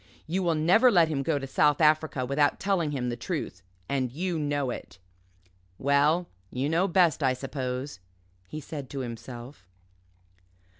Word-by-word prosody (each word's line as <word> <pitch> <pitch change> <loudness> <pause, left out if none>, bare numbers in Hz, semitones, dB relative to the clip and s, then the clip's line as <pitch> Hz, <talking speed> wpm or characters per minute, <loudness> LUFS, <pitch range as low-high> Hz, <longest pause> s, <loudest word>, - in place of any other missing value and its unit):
You 180 +4 -1
will 170 -3 +1
never 180 +11 +5
let 175 -8 +4
him 145 -3 -1
go 145 +2 0
to 135 - -4
South 145 +1 +2
Africa 155 -4 +2
without 145 +2 +1
telling 190 -6 0
him 130 -4 -2
the 120 - -2
truth 120 - -4 0.3
and 130 -3 -1
you 170 +4 -2
know 145 -3 -1
it." - - -8 0.8
"Well 145 +5 +2 0.2
you 130 +3 -2
know 170 +4 +2
best, 175 -4 +3
I 130 -2 +3
suppose," 130 -2 -4 0.5
he 155 - -6
said 140 -2 -7
to 140 - -4
himself. 120 -1 -8
145 Hz, 155 wpm, -27 LUFS, 130-165 Hz, 0.8 s, never